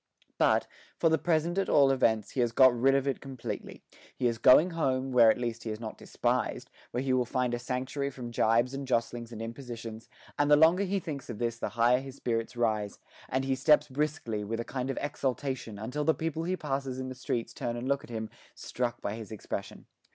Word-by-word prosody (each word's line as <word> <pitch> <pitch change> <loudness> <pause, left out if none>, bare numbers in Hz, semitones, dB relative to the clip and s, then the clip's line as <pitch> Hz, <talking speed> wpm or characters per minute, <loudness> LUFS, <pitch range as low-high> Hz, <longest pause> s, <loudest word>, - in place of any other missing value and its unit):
But, - - +4 0.3
for 165 - +3
the 160 - +2
present 170 +2 +1
at 195 - -1
all 140 -2 +5
events, 110 -5 +2
he - - -4
has 120 -2 +2
got 130 +1 +6
rid 135 +3 +3
of 140 0 +1
it 135 - -1
completely; 135 -3 -7 0.3
he 125 - -1
is 115 -2 +1
going 150 +9 +7
home, 135 -5 0
where 120 -3 +7
at - - +3
least 120 -2 -3
he 115 - -4
is 110 0 -4
not 110 -2 -6
despised, - - -1 0.2
where 125 +2 -2
he 135 -1 +1
will 130 -1 +3
find 125 0 -1
a 120 - -1
sanctuary 130 +3 -2
from 125 -3 -7
gibes 115 +3 +2
and 135 0 -5
jostlings 120 -1 -1
and 115 -1 -6
impositions; 115 -2 -7 0.3
and 145 0 +3
the 150 - +8
longer 165 +6 +5
he 195 +1 0
thinks 145 -7 -6
of 115 - -5
this 115 0 -2
the - - -2
higher 120 +2 +3
his 135 0 -9
spirits 115 -2 -2
rise, 110 -4 0 0.3
and 130 +1 0
he 135 - +1
steps 150 +3 +4
briskly, 135 -6 -2
with 115 +3 -3
a 115 - -3
kind 130 0 -3
of 135 - -2
exultation, 130 -5 -3
until 125 +8 -3
the 160 +1 +3
people 160 0 -3
he 185 +1 -1
passes 135 -4 -3
in 130 0 -4
the - - -5
streets 125 -2 -3
turn 120 0 -3
and 120 +2 -4
look 140 0 0
at - - -13
him, 110 -2 -4 0.3
struck 120 -1 -3
by 100 - -2
his 110 0 -8
expression. 110 - -6
125 Hz, 225 wpm, -29 LUFS, 115-140 Hz, 0.3 s, the